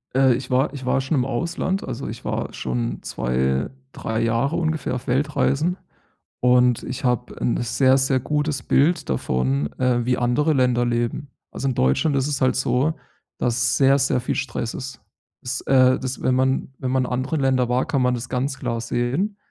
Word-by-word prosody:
Äh, 135 -1 +5
ich 130 - -6
war 130 +3 +1
ich 135 -3 -7
war 130 +1 +2
schon 135 +4 -1
im 125 - +1
Ausland. 170 +8 -2
Also, - - -5
ich - - -8
war - - -3
schon - - -3
2, 65 +2 -1 0.2
3 110 -3 -3
Jahre 115 +7 +1
ungefähr 160 -5 -1
auf 125 +1 -7
Weltreisen. 150 +5 +1 0.6
Und 125 -1 +3
ich 130 - -6
habe 125 -1 -1
'n 120 - +1
sehr, 130 +3 +3
sehr 135 0 +2
gutes 150 -1 -1
Bild 165 +6 +2
davon, 65 +2 0
äh, 125 -2 +1
wie 125 0 +1
andere 135 +6 +2
Länder 125 -3 +2
leben. 120 +4 -1 0.2
Also, 135 - -3
in 130 - 0
Deutschland 65 - +2
ist 135 0 +1
es 145 -2 -2
halt 130 -1 +3
so, 130 +4 +1 0.4
dass 120 0 +1
sehr, 135 0 +4
sehr 130 -1 +1
viel 120 - -2
Stress 115 -3 -3
ist. 130 -2 -7 0.4
Ist, - - -3
äh 130 -1 +5
dass, 130 0 -5
wenn 130 - +2
man 130 +1 +1
wenn 130 - -2
man 130 -1 +1
in - - -6
anderen 130 +5 -1
Ländern 130 -2 +2
war, 125 +1 +1
kann 145 -5 0
man 125 0 +2
das 125 0 -5
ganz 135 +1 -2
klar 115 -3 -2
sehen. 125 - -1
130 Hz, 190 wpm, -22 LUFS, 120-135 Hz, 0.6 s, Äh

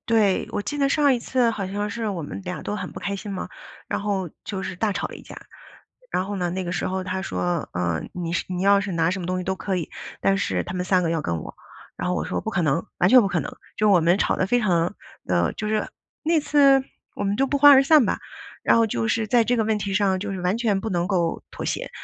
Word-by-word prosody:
对。 215 -4 +2
我 205 - -1
记 290 - -4
得 275 - +3
上 285 -1 +4
一 245 - -1
次 245 0 +1
好 200 -4 -3
像 205 +2 -3
是 225 +1 -3
我 180 -5 -3
们 145 - -7
俩 180 -1 -5
都 205 - -3
很 - - -6
不 - - -8
开 200 0 -2
心 200 +1 -6
嘛， 190 - -4 0.4
然 - - -2
后 195 -4 -1 0.2
就 195 -2 -4
是 185 - -5
大 210 +2 0
吵 - - -2
了 - - -9
一 - - -13
架。 - - -11 0.8
然 185 - 0
后 205 0 -4
呢， 180 -2 -1
那 185 +1 -3
个 175 - -3
时 - - -1
候 190 0 -2
他 190 0 -3
说： 175 -4 -2
“呃， 90 -2 -1
你 170 -2 -4
是 - - -1
你 180 0 -3
要 200 0 +5
是 195 -2 -4
拿 165 +1 +2
什 190 - -2
么 175 - -5
东 185 +1 -1
西 180 - -4
都 190 +1 -1
可 195 -1 -2
以， 170 -4 -4 0.3
但 195 0 +3
是 95 - 0
他 - - -6
们 180 0 -2
3 185 -1 +2
个 165 - 0
要 165 - 0
跟 85 -8 -2
我。” - - -9 0.4
然 - - -3
后 180 - +1
我 - - -1
说： - - -2
“不 220 - -4
可 185 -5 0
能， 155 +6 0
完 - - +4
全 255 - +9
不 200 - +1
可 175 -3 0
能。” - - -5 0.3
就 210 -1 +3
我 180 - +6
们 175 +4 +3
吵 - - +1
得 185 - +1
非 245 +4 +2
常 175 -3 +1 0.3
的 85 -1 +1
就 215 - -4
是 215 -1 0 0.3
那 325 -1 +2
次 275 -2 +4 0.3
我 205 - -3
们 200 +1 0
就 270 - +2
不 285 - 0
欢 290 +1 +9
而 270 - +7
散 290 -2 +6
吧。 - - 0 0.4
然 - - +4
后 230 -1 +4
就 115 - -1
是 220 - 0
在 235 -1 +4
这 245 +2 +1
个 225 - +2
问 215 -1 +1
题 200 -1 -3
上 190 -1 +2
就 200 +1 -4
是 190 - -4
完 180 +5 0
全 210 -5 +1
不 220 - -4
能 175 -1 0
够 175 -4 0
妥 - - -7
协。 - - -3
195 Hz, 300 characters per minute, -24 LUFS, 180-220 Hz, 0.8 s, 全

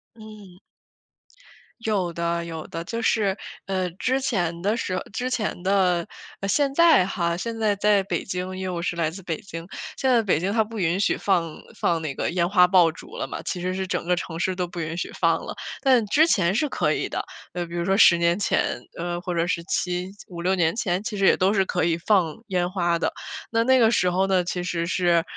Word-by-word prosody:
嗯。 210 -4 -13 1.2
有 200 -6 -1
的 170 0 -1
有 160 -2 -6
的。 165 0 -5
就 230 +6 -4
是， 210 -4 +2 0.3
呃， 185 -2 -1
之 255 +9 0
前 175 -9 -1
的 205 +4 +1
时 185 -4 -2
之 250 +3 -2
前 210 -7 -2
的 185 -3 +2 0.4
现 280 +5 +2
在 330 - +6
哈， 170 -3 -1
现 230 +4 -4
在 210 -2 +2
在 205 -1 +3
北 200 - -2
京， 185 0 -4
因 190 - -4
为 - - -2
我 175 -2 -3
是 175 - -2
来 165 -2 0
自 190 +4 -9
北 165 -2 -3
京。 165 -3 -8 0.3
现 265 - +1
在 235 -2 +5
北 190 -7 +1
京 185 +4 -1
它 225 - +3
不 220 +1 -9
允 175 +1 +1
许 - - +2
放 170 -5 0 0.2
放 165 -1 0
那 155 -3 -3
个 - - -2
烟 175 -1 +1
花 180 -3 +6
爆 180 -3 +5
竹 160 - -12
了 - - -2
嘛， - - -6
其 180 - -4
实 185 +1 -1
是 190 0 -3
整 - - -2
个 180 0 +2
城 165 -2 -5
市 185 +1 0
都 180 -1 -2
不 175 0 -8
允 160 +1 -4
许 - - -3
放 - - +2
了。 - - -6 0.3
但 255 -5 +4
之 310 +10 +4
前 185 - +2
是 300 - +2
可 - - +1
以 - - -2
的， - - -3 0.3
呃， 180 - -3
那 - - -5
比 170 - -11
如 170 0 -1
说 195 +1 +2
10 170 -5 +7
年 170 +1 +2
前， 205 - 0 0.2
呃， 175 +1 -3
或 180 -1 -3
者 170 0 0
是 170 -1 -1
7 180 +1 -2 0.2
5-6 175 +1 -1
年 170 -1 +1
前， 190 -5 -1
其 215 -1 -4
实 195 - +2
也 - - +6
都 190 +2 +3
是 195 -2 +3
可 - - -1
以 165 -1 +1
放 170 -3 +1
烟 180 -2 0
花 175 -3 0
的。 - - 0 0.4
那 230 0 +2
那 260 +2 +4
个 225 -2 +5
时 180 -5 +2
候 190 +2 +1
呢， 185 -2 +2
其 180 0 -3
实 170 -1 -2
是， 175 -1 +2
185 Hz, 240 characters per minute, -24 LUFS, 170-205 Hz, 1.2 s, 10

